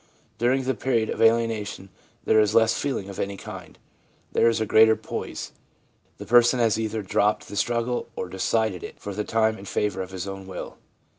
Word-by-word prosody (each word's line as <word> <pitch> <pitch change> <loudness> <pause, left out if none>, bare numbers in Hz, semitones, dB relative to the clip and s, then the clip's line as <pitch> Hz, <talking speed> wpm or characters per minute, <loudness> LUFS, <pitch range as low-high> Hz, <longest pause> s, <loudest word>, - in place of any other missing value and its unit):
During 130 +3 +2
the 130 +1 0
period 115 -1 0
of - - -4
alienation 115 -4 +1 0.4
there 110 - +4
is 105 0 +2
less 115 0 +5
feeling 125 -5 -2
of 100 - -8
any 100 0 -3
kind. - - -10 0.5
There 115 - +4
is 115 - 0
greater 110 +1 +5
poise. - - -6 0.7
The - - -8
person 120 +1 +5
has 110 -2 +2
either 110 -1 -2
dropped 105 +2 +1
the - - -8
struggle 120 +3 -1
or - - -4
decided 95 +1 -1
it - - -9
for 100 - -6
the 105 +2 -2
time 110 0 +1
in 100 - -10
favour 100 -1 -1
of 95 - -6
his 95 0 -6
own 95 -1 -7
will. 95 - -8
110 Hz, 190 wpm, -25 LUFS, 100-115 Hz, 0.7 s, less